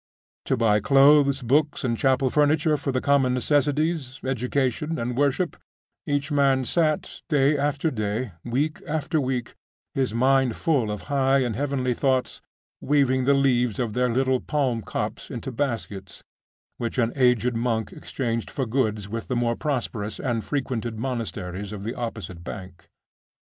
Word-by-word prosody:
To 130 - +1
buy 110 -3 +3
clothes, 140 +2 +5
books, 145 +5 +1
and 120 -3 +1
chapel 130 +1 +2
furniture 150 +1 +3
for 140 -1 -2
the 130 0 -1
common 135 -3 +3
necessities, 145 +1 0
education, 130 +4 -1
and 120 -1 -2
worship, 145 +6 +1 0.5
each 145 +1 -1
man 135 -2 +3
sat, 155 +1 0
day 145 -1 +3
after 145 +2 0
day, 110 0 -2
week 140 +6 -1
after 155 +1 0
week, 130 -2 -2 0.4
his 130 -4 0
mind 130 +1 +2
full 140 -9 +1
of 105 -1 -4
high 135 -1 +3
and 120 -4 -2
heavenly 135 -3 0
thoughts, 130 0 0 0.4
weaving 130 -3 +2
the 140 +1 +4
leaves 125 -5 +2
of 120 -4 -2
their 125 +1 +1
little 130 +1 +2
palm 130 -6 -1
copse - - -4
into 135 - -5
baskets, 115 -8 -4 0.5
which 115 +1 -4
an 120 -2 +1
aged 125 -2 +3
monk 115 -2 -1
exchanged 115 -3 -3
for 135 - -2
goods 110 -4 -1
with 115 +2 -5
the 125 - -1
more 120 -1 +1
prosperous 120 -8 -3
and 120 -4 -1
frequented 120 -5 -3
monasteries 105 -6 -4
of 100 -2 -6
the 115 +3 -3
opposite 105 -8 -6
bank. 90 -2 -9
130 Hz, 150 wpm, -25 LUFS, 115-140 Hz, 0.5 s, clothes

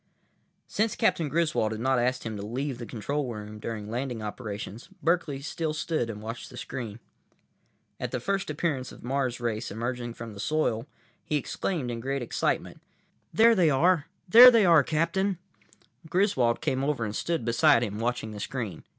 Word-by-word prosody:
———— - - -43 0.3
Since 215 0 0
Captain 160 -3 +1
Griswold 155 -8 +1
had 110 - -5
not 130 +1 +2
asked 125 +2 0
him 110 -1 -3
to 100 - -5
leave 125 +5 -3
the 120 - -6
control 130 +4 -3
room 105 -1 -7
during 105 -1 -5
landing 120 -2 -3
operations, 105 - -6
Berkeley 165 -5 +1
still 160 +1 -3
stood 155 -6 -1
and 105 -1 -6
watched 115 +2 -6
the 125 - -11
screen. 115 -3 -6 1.0
At - - -3
the - - -2
first 195 -3 -1
appearance 145 -4 -2
of - - -13
the - - -9
Mars 130 -2 -1
race 115 -1 -2
emerging 120 +2 -4
from 115 -2 -8
the 100 - -11
soil, 120 -1 0 0.4
he 150 - -2
exclaimed 145 -1 -2
in 115 - -4
great 135 +2 -2
excitement: 120 - -2 0.5
"There 230 +1 +6
they 180 -7 +4
are! 160 +3 +3 0.2
There 240 +7 +11
they 230 -4 +5
are, 165 -4 +7
Captain!" 170 +6 0 0.7
Griswold 165 - +2
came 130 0 0
over 140 -5 0
and 105 0 -4
stood 165 -9 -1
beside 115 0 +4
him, 105 -2 -3
watching 115 -1 -2
the 105 - -7
screen. 105 -6 -4
125 Hz, 180 wpm, -27 LUFS, 115-155 Hz, 1.0 s, There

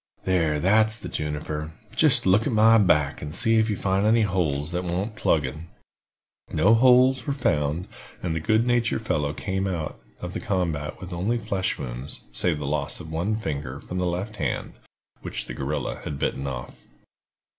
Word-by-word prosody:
There, 80 -5 +1
that's 110 +5 +3
the 90 - -8
juniper. 75 -1 -4 0.2
Jist - - +6
look 100 +4 +4
at - - -1
my 110 +1 +6
back, 75 -8 +2
and 75 - -5
see 115 +4 +3
if 110 0 +2
you 105 - 0
find 95 0 0
any 110 +1 +4
holes 85 -6 -1
that 90 +1 -2
want 95 +5 -3
plugging." 75 -2 -1 0.8
No 95 +8 +4
"holes" 130 +3 +5
were 140 - +1
found, 75 - 0 0.4
and 85 -3 -1
the - - 0
good 110 +8 +2
natured 120 -2 +1
fellow 75 -8 0
came 95 +4 -2
out 85 -5 -4 0.2
of - - -6
the - - -3
combat 80 -6 -2
with 90 -1 -8
only 100 +8 0
flesh 95 -5 -1
wounds, 60 +3 -6
save 75 +6 0
the 75 - -5
loss 70 0 -1
of 80 - -9
one 90 +7 -1
finger 70 - -4
from 90 - -5
the 90 - 0
left 100 +5 -4
hand, 70 -6 -2 0.5
which - - -4
the - - -7
guerrilla 70 +4 -3
had 75 - -4
bitten 70 0 -2
off. 65 -3 -7
90 Hz, 180 wpm, -25 LUFS, 75-110 Hz, 0.8 s, Jist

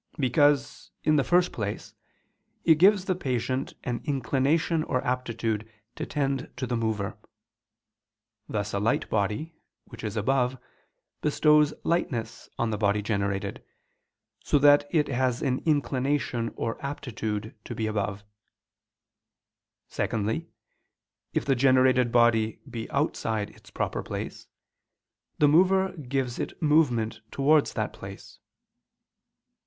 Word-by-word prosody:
Because, 145 +1 +2
in 155 0 +3
the 140 - +3
first 175 +3 +3
place, 105 -2 -5 0.7
it 160 -2 +5
gives 195 +1 +5
the 190 - +1
patient 130 -5 -2
an 120 -1 -3
inclination 145 +4 +1
or 125 - -1
aptitude 115 -3 -2 0.2
to - - -5
tend 135 -2 -1
to 130 - -2
the 120 0 -2
mover: 110 -3 -2 1.3
thus 105 -1 -2
a 100 - 0
light 105 +3 +1
body, 105 +10 -1 0.3
which 115 - -12
is 105 0 -3
above, 125 +3 +1 0.6
bestows 150 0 +4
lightness 120 -10 -2
on 115 -1 0
the 105 - -2
body 105 0 +1
generated, 100 -2 -2 0.8
so 150 - +3
that 145 0 +6
it 150 -3 +2
has 125 -2 0
an 130 -2 +1
inclination 135 -5 0
or 115 +5 -4
aptitude 110 -6 -4
to - - -7
be 110 - -2
above. 105 -1 -2 1.6
Secondly, 110 +9 -2 0.8
if - - -1
the 140 - +3
generated 130 -1 +4
body 115 -2 +3
be 115 -3 -6
outside 110 -7 -1
its - - -18
proper - - -2
place, - - -6 0.9
the 150 - +5
mover 190 +5 +4
gives 135 -6 -3
it - - -4
movement 125 -9 +2
towards 145 +2 +3
that - - -2
place. - - -11
130 Hz, 120 wpm, -27 LUFS, 110-145 Hz, 1.6 s, that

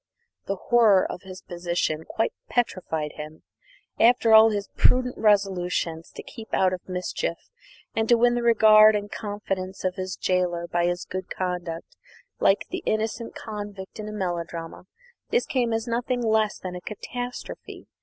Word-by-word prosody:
The 195 - -1
horror 215 -2 +4
of - - -7
his 185 -1 -11
position 170 -3 -2
quite 225 - -1 0.2
petrified 175 -10 -1
him. 155 +1 -9 0.6
After 230 -1 +5
all 220 0 +9
his 205 -1 -2
prudent 250 0 +3
resolutions 180 -5 +1
to - - -7
keep 225 -2 -10
out 185 -1 +3
of 185 0 -7
mischief 180 -2 -2 0.6
and 220 0 0
to 240 - +6
win 240 +1 +4
the 240 - 0
regard 215 -2 +7
and 205 0 -3
confidence 195 -3 -4
of 185 0 -1
his 185 0 -4
gaoler 180 -2 0
by 175 0 +1
his 175 0 -2
good 185 0 -6
conduct, 180 -3 -4 0.4
like 195 - +3
the 365 0 -3
innocent 220 +2 -2
convict 205 -2 -7
in 215 0 -5
a - - -6
melodrama, 175 -4 -4 0.4
this 475 - +2
came 245 -3 0
as 225 0 -1
nothing 245 +1 -1
less 220 -1 +2
than 185 -1 -6
a 180 - -6
catastrophe. 245 +5 -7
200 Hz, 155 wpm, -25 LUFS, 180-225 Hz, 0.6 s, all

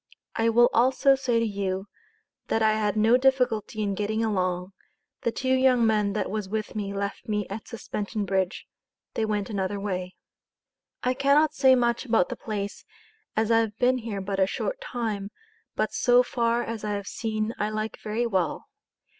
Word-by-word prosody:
I 225 0 +2
will 240 +1 +5
also 260 +3 +4
say 260 -3 0
to 230 - +1
you, 195 -2 -2 0.6
that 225 - +1
I 215 0 +4
had 215 -1 0
no 225 +3 +5
difficulty 250 -5 +1
in 200 -1 0
getting 215 +3 -1
along. 185 -2 -1 0.5
the 235 - 0
two 260 +2 0
young 260 -2 +4
men 210 -2 +2
that 215 - -1
was 210 -2 -3
with 215 +1 -3
me 205 -2 -3
left 200 +4 -4
me 210 -1 0
at 210 +1 -6
Suspension 210 -2 -4
Bridge. 190 -1 -1 0.5
they 220 - 0
went 210 0 -2
another 200 0 -2
way. 185 -2 -4 0.9
I 250 - +2
cannot 280 +3 +3
say 265 -2 +5
much 240 -1 +1
about 225 -7 +2
the - - -4
place 205 -2 -5 0.5
as 220 +1 +1
I 225 - +6
have 220 -2 -1
ben 255 +1 +3
here 220 -4 -4
but 195 0 -3
a 190 - +4
short - - -3
time 220 - -3 0.5
but - - -1
so 245 0 +4
far 235 -1 0
as 230 -2 -5
I 210 -1 -1
have 200 -1 -3
seen 220 -1 -2
I 210 - 0
like 215 0 -4
very 220 +3 -2
well. 185 -8 -1
215 Hz, 180 wpm, -26 LUFS, 200-240 Hz, 0.9 s, I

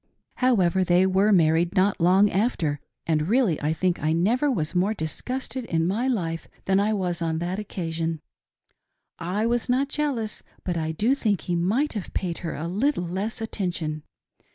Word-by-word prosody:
However, 190 -8 +3
they 180 +1 +4
were 190 +3 +3
married 170 0 +3
not 190 -1 +2
long 190 +4 +5
after, 175 - 0 0.3
and 155 -1 +1
really 220 - +2
I 150 +1 +1
think 175 +2 0
I 155 +2 +1
never 230 - +2
was 160 - -1
more 190 +4 +1
disgusted 255 +10 -4
in 165 -5 0
my 220 +7 0
life 165 -10 -2 0.2
than 190 0 +3
I 205 +2 +2
was 180 -4 -1
on 160 -1 0
that 175 +4 -2
occasion. 165 -5 -3 1.0
I 190 +6 -1
was 240 +1 0
not 265 +3 +2
jealous, 270 -8 -2 0.2
but 180 - -2
I 160 -1 -1
do 215 +11 +2
think 210 - 0
he 175 - -2
might 215 - +1
have 210 -5 -6
paid 175 -3 -2
her 170 -3 -4
a 160 +3 -4
little 210 +4 0
less 195 +6 -3
attention. 175 -8 -3
185 Hz, 175 wpm, -25 LUFS, 165-220 Hz, 1.0 s, long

